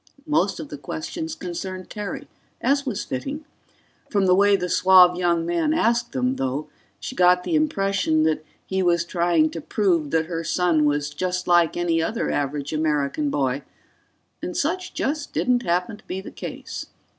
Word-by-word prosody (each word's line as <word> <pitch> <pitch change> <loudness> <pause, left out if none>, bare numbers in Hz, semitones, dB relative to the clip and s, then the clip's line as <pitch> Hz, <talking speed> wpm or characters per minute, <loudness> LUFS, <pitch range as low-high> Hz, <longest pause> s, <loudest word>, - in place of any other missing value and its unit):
Most 305 0 +1
of - - -7
the - - -7
questions 320 -2 -5
concerned 185 - -6
Terry, 210 -2 -5 0.3
as 280 +1 +1
was 210 -5 -2
fitting. 280 - -5 0.6
From 200 -3 +2
the 185 - +5
way 200 +2 +5
the 180 -2 -1
suave 180 0 +6
young 170 -2 +1
man 175 - +1
asked 235 -6 +1
them, 260 0 0
though, 135 +3 -2 0.3
she - - -6
got 180 0 +4
the - - -3
impression 195 - +2
that 155 -1 +1 0.2
he 190 0 -1
was 170 -2 +2
trying 170 -3 +2
to 165 - -6
prove 170 -5 +1
that 160 +1 +1
her 165 0 -4
son 165 -3 +2
was 145 0 0
just 180 +1 -2
like 175 -2 +4
any 170 -1 +1
other 225 +8 -1
average 145 +1 -2
American 155 - 0
boy, 135 - 0 0.8
and 180 - -4
such 365 +5 -2
just 295 +1 -2
didn't 250 -1 +2
happen 180 +3 -1
to 215 - -23
be 185 - -3
the 190 - -9
case. - - -7
180 Hz, 170 wpm, -23 LUFS, 165-225 Hz, 0.8 s, suave